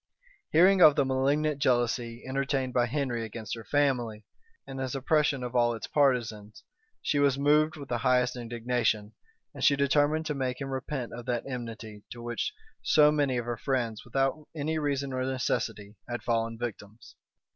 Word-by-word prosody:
Hearing 185 +4 +5
of 150 -4 +8
the 140 - +2
malignant 140 +3 +1
jealousy 120 -2 0
entertained 135 -1 -1
by 120 -1 +2
Henry 125 -3 -2
against 110 -1 -6
her 115 - -6
family, 120 -7 0 0.4
and 135 - -7
his 130 0 -3
oppression 140 0 +1
of 125 0 -5
all 120 -1 +3
its 110 - -6
partisans, 115 -7 0 0.4
she 145 - +1
was 140 -1 +3
moved 150 +3 +3
with 140 -2 -8
the 120 -1 -1
highest 125 0 +2
indignation; 120 -3 -1 0.4
and - - -7
she 140 - +5
determined 145 +3 +2
to 155 - -1
make 130 -3 -2
him 135 -1 -5
repent 130 -1 -4
of 120 +1 -8
that 120 -2 -1
enmity 115 -4 -7
to 120 - -11
which 120 -1 -3 0.3
so 150 -1 +5
many 145 -4 +1
of 120 - -2
her 120 -1 -3
friends, 120 -4 -2
without 135 +4 -1
any 155 +1 -1
reason 140 -2 -1
or 130 0 -1
necessity, 115 -5 -2 0.2
had 120 0 -4
fallen 115 -1 -1
victims. 110 -2 -7
130 Hz, 170 wpm, -28 LUFS, 120-140 Hz, 0.4 s, of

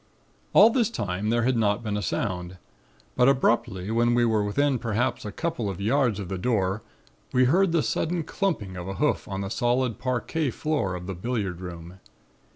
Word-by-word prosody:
"All 220 +3 +8
this 235 -3 +2
time 100 - -2
there 120 +1 +2
had 130 +1 +2
not 110 0 +1
been 105 -2 -2
a 105 - -1
sound, 90 -4 -3 0.6
but 125 +2 +5
abruptly 115 -7 +1
when 120 +1 +2
we 120 0 +3
were 110 -2 +2
within 130 +6 +1
perhaps 115 +2 -1
a 105 - -4
couple 160 -7 -2
of 95 -1 -5
yards 115 0 +1
of 100 - -5
the 95 0 -4
door 100 -1 0 0.5
we 130 0 +4
heard 180 +7 +3
the 165 -3 +2
sudden 170 0 -1
clumping 155 - -2
of 90 0 -6
a 95 - -4
hoof 150 +5 0
on 95 0 -4
the 100 - -3
solid 120 +1 0
parquet 130 +5 -1
floor 130 -8 -1
of 90 0 -7
the 95 - -4
billiard 95 -2 -3
room. 90 0 -9
115 Hz, 190 wpm, -26 LUFS, 95-130 Hz, 0.6 s, All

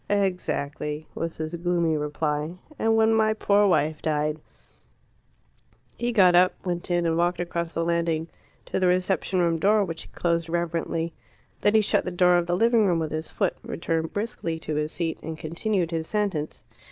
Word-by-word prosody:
"Exactly," 155 -6 -1
was 165 0 -4
his 155 +1 -4
gloomy 170 -1 +1
reply. 150 +1 -2 0.2
"And 225 0 +3
when 220 0 +4
my 220 -1 +3
poor 205 -1 +3
wife 155 -4 +1
died 150 0 -1 0.8
" - - -38
He 240 0 -1
got 190 -6 +5
up, 180 +1 +5
went 175 -1 -3
in, 175 -1 +1
and 165 -1 +1
walked 175 +1 +1
across 170 -1 -3
the 165 - 0
landing 165 -1 0 0.4
to - - -2
the 185 - +3
reception 185 0 +1
room 165 -1 +1
door, 205 +3 +3
which 165 -2 -6
he - - -11
closed 170 -1 -1
reverently. 165 -1 -2 0.5
Then 205 - +2
he 220 - +6
shut 210 - +1
the - - -3
door 180 0 +4
of 170 - -3
the 175 0 +1
living 230 0 +4
room 175 -2 +2
with 160 -2 -2
his 155 +1 -4
foot, - - -1
returned 165 -1 -2
briskly 205 -6 -3
to 155 - -3
his 150 +1 -1
seat, 165 -2 -2
and 160 -1 -6
continued 170 +3 -1
his 160 -1 -2
sentence. 195 -8 -2
170 Hz, 185 wpm, -25 LUFS, 160-185 Hz, 0.8 s, he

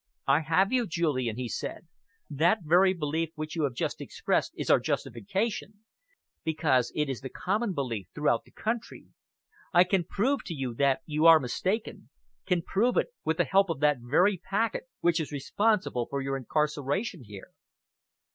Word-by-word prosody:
"I 135 +2 +4
have 165 +5 +2
you, 245 -3 +2
Julian," 145 - -1
he 125 -1 -3
said. 160 - -5 0.4
"That 170 +7 +2
very 180 +4 +5
belief 160 -2 -2
which 155 +1 -5
you 160 -3 +1
have 130 -3 -3
just - - -3
expressed - - -1
is - - -4
our - - +6
justification, 205 - -3 0.6
because 150 -6 +1
it 150 -1 0
is 135 -3 -4
the 135 - -6
common 200 - -1
belief 115 - -3
throughout 150 0 +1
the - - -21
country. 225 +1 -4 0.6
I 175 -1 +7
can 185 0 +1
prove 255 - 0
to 165 - -5
you 130 -4 -3
that 140 +4 +2
you 155 +1 +2
are 165 -1 +9
mistaken 185 - -3 0.4
can 180 -3 +1
prove 235 +9 +1
it, - - 0
with - - 0
the - - +3
help 195 -1 +3
of 165 -5 -2
that 150 -2 +4
very 180 +11 +3
packet 230 - -1 0.2
which 170 -1 +2
is 155 - -4
responsible 165 - 0
for 140 - -2
your 135 0 -2
incarceration 145 - -1
here." 105 -3 -11
160 Hz, 170 wpm, -28 LUFS, 135-195 Hz, 0.6 s, are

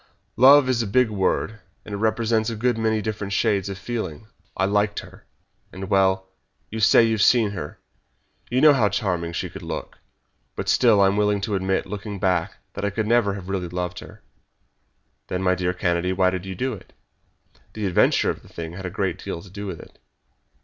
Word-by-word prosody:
"Love 135 +3 +7
is 125 -2 +1
a 115 - -2
big 120 +2 +2
word, 105 +2 -1 0.3
and 105 - -8
it - - -2
represents 110 +1 +1
a 115 - -4
good 120 +2 +1
many 110 -1 0
different 105 -2 -4
shades 100 -2 +1
of 100 - -5
feeling. 105 -4 -5 0.3
I 95 - +2
liked 105 +1 +1
her, - - -16 0.4
and 95 +2 -7
well, 95 -1 +2 0.4
you 110 - -4
say 110 +2 +6
you've 110 -2 +1
seen 110 -2 +4
her 85 -7 -6 0.7
you 125 +2 +1
know 155 -1 +8
how 115 -7 +3
charming 90 -4 -1
she 85 - -3
could - - -10
look. - - -6 0.6
But - - -4
still 115 -5 +4
I - - +6
am 95 +1 +2
willing 105 -1 +2
to 105 +1 -3
admit, 95 0 0
looking 100 0 -6
back, 90 -3 0 0.2
that 100 - -6
I 100 - +1
could 110 +2 -2
never 110 -3 +2
have 95 -3 -8
really 95 -2 -2
loved 90 0 -4
her." - - -13 1.0
"Then, 90 +1 -3
my 90 -1 +3
dear 90 0 0
Kennedy, 90 0 0
why 95 0 +2
did 95 0 -5
you 95 - -5
do 130 +7 -2
it?" 100 - -12 0.8
"The 105 -2 -4
adventure 95 - +3
of - - -9
the - - -18
thing 80 0 -7
had 95 +1 -6
a - - -3
great 95 -1 -3
deal 90 -4 -5
to 95 - -15
do 100 +1 -6
with 90 -4 -6
it." - - -15
100 Hz, 205 wpm, -23 LUFS, 95-110 Hz, 1.0 s, know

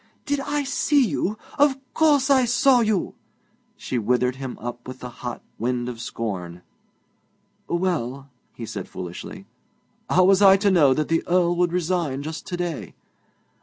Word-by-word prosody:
'Did 285 -1 0
I 290 +1 -1
see 285 0 +2
you? 205 +3 -2 0.2
Of 285 -2 +4 0.2
course 290 -3 +3
I 265 -2 +5
saw 250 +2 +4
you!' 215 -5 0 0.6
She 125 - -3
withered 125 +3 +1
him 130 -2 -6
up 120 +1 -7
with 130 0 -7
the 125 - -7
hot 120 -1 -5 0.2
wind 120 +1 -1
of 120 -2 -6
scorn. 90 -8 -5 1.0
'Well,' 150 -7 -2 0.3
he 115 - -6
said - - -6
foolishly, 90 -1 -8 0.6
'how 185 - +4
was 195 +1 +5
I 195 -1 +8
to 200 0 +2
know 145 -8 +5
that 155 +1 -1
the 165 0 +1
Earl 175 -1 +2
would 175 -1 +2
resign 170 -6 -1
just 160 +1 -6
to 175 - -4
day?' 165 - -4
170 Hz, 160 wpm, -23 LUFS, 125-210 Hz, 1.0 s, I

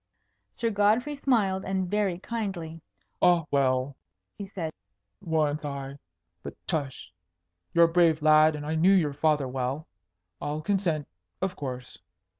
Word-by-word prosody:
Sir 230 -1 -1
Godfrey 215 +7 +2
smiled, 220 -9 +1
and 190 -1 -1
very 200 -2 0
kindly. 185 -7 -5 0.4
"Ah, 175 -3 +4
well," 130 -1 +1 0.4
he 200 - -7
said, 165 -5 -5 0.5
"once 155 -2 0
I 140 -1 -5 0.4
but - - -8
tush! 140 - -3 0.6
You're 170 0 +7
a 165 - -2
brave 165 -3 +4
lad, 155 0 +6
and 145 0 -6
I 155 - -2
knew 170 +5 +4
your 155 -6 +2
father 150 -2 +1
well. 130 +4 -3 0.5
I'll 150 +1 -3
consent, 170 -6 0 0.3
of 190 -1 -2
course. 125 -3 -7
160 Hz, 135 wpm, -27 LUFS, 145-190 Hz, 0.6 s, You're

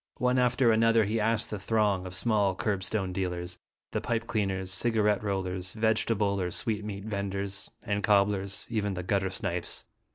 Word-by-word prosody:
One 125 0 +2
after 125 -1 +4
another 115 0 +4
he 110 +3 0
asked 115 +1 0
the 105 - -3
throng 100 -3 +1
of 90 - -7
small 105 -3 +2
curbstone 95 -1 -1
dealers, 90 -1 -3 0.3
the - - -1
pipe 115 -1 -1
cleaners, 95 -5 -1
cigarette 105 -1 +2
rollers, 95 -2 -2
vegetable 110 -2 +1
or 90 - -1
sweetmeat 105 0 -3
venders, 100 -1 -4
and 105 0 -1
cobblers, 100 -1 +2
even 105 -4 -1
the 90 - -4
gutter 95 0 +1
snipes. 90 -3 -4
100 Hz, 155 wpm, -29 LUFS, 95-110 Hz, 0.3 s, after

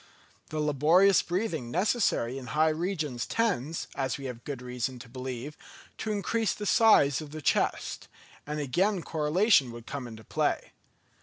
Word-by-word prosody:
The 155 - -3
laborious 155 +7 +4
breathing 170 - -2
necessary 170 - +1
in 125 - -10
high 155 +7 +3
regions 155 - -2
tends, 165 - -1
as 135 -3 -2
we 140 - -8
have 125 -2 -6
good 140 -4 -5
reason 125 0 -4
to 120 - -11
believe, 130 +3 -6 0.4
to 220 - -2
increase 215 +2 0
the 210 - -6
size 185 - +5
of 155 - -8
the 155 +2 -7
chest; 150 - 0 0.4
and 150 +1 -3
again 180 +7 +1
correlation 155 - +3
would 120 -1 -10
come 135 -1 -5
into 110 -1 -10
play. - - -1
150 Hz, 155 wpm, -29 LUFS, 125-185 Hz, 0.4 s, size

